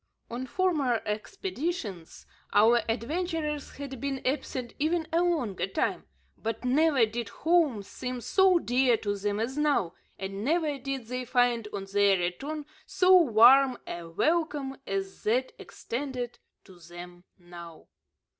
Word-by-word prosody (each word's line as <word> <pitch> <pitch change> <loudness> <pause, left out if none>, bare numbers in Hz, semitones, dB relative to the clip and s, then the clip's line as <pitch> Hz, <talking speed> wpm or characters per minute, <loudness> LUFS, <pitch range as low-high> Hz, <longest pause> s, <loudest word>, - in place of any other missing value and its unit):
On 250 +2 -4
former 295 -9 +1
expeditions 245 - -4 0.3
our 230 +3 +5
adventurers 300 +4 -2
had 270 -3 -7
been 275 -1 -2
absent 255 -2 -2
even 320 +2 0
a 335 - +3
longer 245 - 0
time, 190 - -2 0.3
but 225 +2 -4
never 275 -1 +4
did 225 0 -5
home 315 -10 +1
seem 250 +5 -6
so 375 - +4
dear 250 -5 +2
to 205 -2 -2
them 205 +1 -2
as 255 +6 -2
now, 285 - +1 0.2
and 195 +1 -5
never 305 0 0
did 270 -2 -4
they 250 +2 -4
find 245 -3 +1
on 195 -1 -5
their 200 -1 +4
return 275 - -3 0.2
so 375 -1 +5
warm 260 -3 +6
a 170 -1 -7
welcome 295 - 0
as 195 0 -4
that 250 +5 0
extended 250 -1 -5 0.2
to 185 -3 -17
them 175 +1 -11
now. 170 -2 -12
250 Hz, 135 wpm, -28 LUFS, 205-300 Hz, 0.3 s, warm